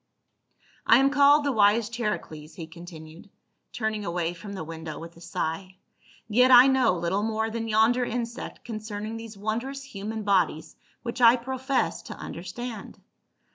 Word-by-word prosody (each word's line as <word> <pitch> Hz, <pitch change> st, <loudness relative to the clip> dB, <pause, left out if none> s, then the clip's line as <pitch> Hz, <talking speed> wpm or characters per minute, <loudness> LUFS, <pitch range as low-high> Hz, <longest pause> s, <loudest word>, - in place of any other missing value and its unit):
"I 230 Hz, -, +6 dB
am 270 Hz, +1 st, +3 dB
called 285 Hz, +1 st, +5 dB
the 285 Hz, -, +2 dB
wise 210 Hz, -1 st, +3 dB
Charicles," 210 Hz, -10 st, -5 dB
he 165 Hz, -, -7 dB
continued, 165 Hz, +2 st, -12 dB, 0.4 s
turning 220 Hz, -2 st, -2 dB
away 170 Hz, -2 st, -2 dB
from 200 Hz, +4 st, -9 dB
the 190 Hz, -, -5 dB
window 160 Hz, -1 st, -7 dB
with 165 Hz, +1 st, -10 dB
a 170 Hz, -, -16 dB
sigh, 175 Hz, +2 st, -4 dB, 0.5 s
"yet 250 Hz, +4 st, +4 dB
I 250 Hz, 0 st, +9 dB
know 265 Hz, -5 st, +3 dB
little 175 Hz, +3 st, -1 dB
more 220 Hz, +1 st, -1 dB
than 225 Hz, 0 st, -3 dB
yonder 225 Hz, +3 st, +3 dB
insect 235 Hz, 0 st, -5 dB
concerning 215 Hz, -1 st, -5 dB
these 225 Hz, -2 st, -9 dB
wondrous 235 Hz, +7 st, -3 dB
human 220 Hz, -3 st, -6 dB
bodies 180 Hz, -5 st, +1 dB, 0.3 s
which 240 Hz, +1 st, -5 dB
I 235 Hz, 0 st, +8 dB
profess 260 Hz, +2 st, -2 dB
to -, -, -9 dB
understand. 220 Hz, +5 st, -7 dB
215 Hz, 150 wpm, -26 LUFS, 175-240 Hz, 0.5 s, I